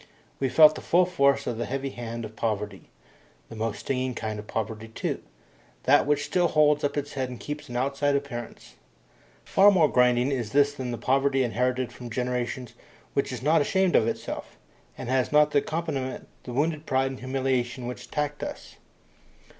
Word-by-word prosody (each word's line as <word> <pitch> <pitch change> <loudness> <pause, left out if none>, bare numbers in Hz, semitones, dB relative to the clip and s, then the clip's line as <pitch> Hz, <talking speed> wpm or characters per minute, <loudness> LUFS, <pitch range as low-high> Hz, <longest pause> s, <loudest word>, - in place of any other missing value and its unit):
We 135 - +1
felt 155 +2 +7
the - - -8
full 180 +2 +3
force 140 -6 +2
of 115 -2 -3
the 120 - -2
heavy 135 +1 -3
hand 115 -1 -6
of 110 0 -10
poverty 105 -3 -3 0.6
the - - -9
most 110 0 -3
stinging 130 -2 -2
kind 110 -2 -4
of 105 - -9
poverty 110 0 -4
too, 110 - -3 0.6
that 145 +2 +4
which 145 0 +1
still 180 -1 +2
holds 150 -2 +3
up 145 0 -1
its 145 0 -3
head 130 -2 -2
and 125 - -8
keeps 150 -1 -6
an 120 - -3
outside 140 +2 +1
appearance. 130 -5 -5 0.7
Far 200 +2 +6
more 180 -6 +5
grinding 125 0 +3
is 120 -6 -3
this 145 0 +4
than 130 -3 -5
the 120 - -3
poverty 135 +1 +2
inherited 125 +1 -1
from 120 -1 -9
generations 125 +1 -3 0.4
which 140 - 0
is 125 -1 -6
not 155 +2 +4
ashamed 190 +4 +2
of 110 - +4
itself, - - -5 0.4
and - - -6
has 130 0 +1
not 150 0 +5
as - - -17
an - - +5
accompaniment 145 -5 -3 0.2
the 125 - -6
wounded 155 +3 -1
pride 135 0 +1
and 130 - -8
humiliation 130 -1 -1
which 125 +1 -6
attacked 150 0 -3
us. - - -7
130 Hz, 185 wpm, -26 LUFS, 120-145 Hz, 0.7 s, felt